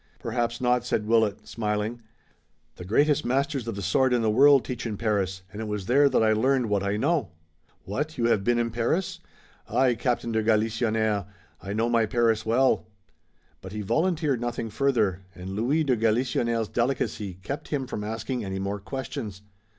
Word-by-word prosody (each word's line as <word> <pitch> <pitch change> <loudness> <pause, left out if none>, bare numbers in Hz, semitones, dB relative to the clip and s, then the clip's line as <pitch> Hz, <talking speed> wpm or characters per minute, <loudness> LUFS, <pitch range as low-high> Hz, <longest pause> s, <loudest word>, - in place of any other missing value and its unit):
"Perhaps 120 0 -2
not!" 125 -1 +2
said 110 -3 -1
Willet, 110 -2 +1
smiling. 105 +1 -2 0.8
"The 90 - -8
greatest 145 +9 +2
masters 135 0 -1
of 115 - -3
the 100 - -5
sword 130 +8 +2
in 120 -2 +2
the 110 - +2
world 140 +3 +6
teach 125 -2 -4
in 105 -2 -4
Paris, 95 -4 -1
and 105 - -6
it 110 - -4
was 105 -2 -3
there 140 +6 +4
that 125 - +2
I 110 0 +4
learned 125 +1 +2
what 100 -1 +2
I 100 +1 -1
know." 140 - +1 0.5
"What, 150 - -3
you 120 - +1
have 110 -4 +2
been 120 +3 +2
in 115 -1 0
Paris?" 120 +11 -1 0.5
"Aye, 130 -2 +3
Captain 120 0 -1
de 110 0 +1
Galisonnière, 110 -2 +1 0.3
I 100 - -5
know 115 +2 +1
my 115 -2 +2
Paris 115 -1 +1
well." 125 -1 +2 0.7
But 95 +1 -9
he 105 - -4
volunteered 150 - 0
nothing 120 -2 -3
further 110 -8 +1
and 90 +1 -7
Louis 125 +11 +1
de 135 -4 +2
Galisonnière's 115 0 0
delicacy 120 -6 -1
kept 140 - -6
him 140 -3 -2
from 105 -4 -5
asking 115 +3 -3
any 95 -1 -4
more 100 +1 -3
questions. 105 -3 -6
115 Hz, 180 wpm, -26 LUFS, 105-130 Hz, 0.8 s, world